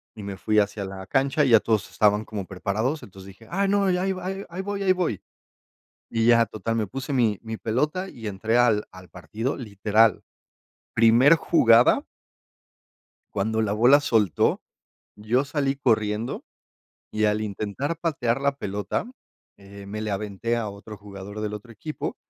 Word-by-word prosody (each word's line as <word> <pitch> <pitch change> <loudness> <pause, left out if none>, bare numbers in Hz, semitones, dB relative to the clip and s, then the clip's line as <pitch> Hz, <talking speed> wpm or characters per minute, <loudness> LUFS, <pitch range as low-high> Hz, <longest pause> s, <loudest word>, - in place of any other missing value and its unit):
y 105 - -9
me 100 -1 -5
fui 105 +2 0
hacia 100 0 -1
la 95 0 -8
cancha 135 - +1
y - - +1
ya 115 -2 +7
todos 110 -2 0
estaban 105 0 +2
como 105 -3 -5
preparados, 110 +9 -2
entonces 95 0 -12
dije: 100 +4 -15
"Ay 195 +3 +1
no, 200 0 +2
ya 180 0 0
ahí 190 +1 0 0.4
ahí 175 +3 -5
voy, 200 +1 -4
ahí 190 - +4
voy". 175 - -2 0.9
Y 115 -1 0
ya, 115 -1 +6
total, 115 +1 -4
me 110 -2 -1
puse 135 +7 -5
mi 115 -6 +2
mi 110 -1 -6
pelota 150 - -1
y 115 -8 -8
entré 110 +4 0
al 115 -4 +3
al 95 -1 -14
partido, 105 - -4
literal. 110 -2 +2 0.7
Primer 115 +7 +6
jugada 120 -8 +4 1.3
cuando 110 +3 0
la 105 -2 0
bola 120 +7 +5
soltó, 110 - +1 0.6
yo 110 +6 0
salí 140 -1 -1
corriendo, 110 -3 0 0.7
y 110 0 0
al 105 0 +1
intentar 110 +9 -3
patear 135 -7 0
la 140 0 0
pelota, 105 - -3 0.5
eh, 100 0 -12
me 105 +2 -5
le 110 -1 -3
aventé 105 +3 -2
a 115 -2 -2
otro 100 +2 -10
jugador 100 +1 -9
del 105 0 -3
otro 105 +3 -10
equipo, 155 +8 -5
110 Hz, 165 wpm, -25 LUFS, 105-135 Hz, 1.3 s, ya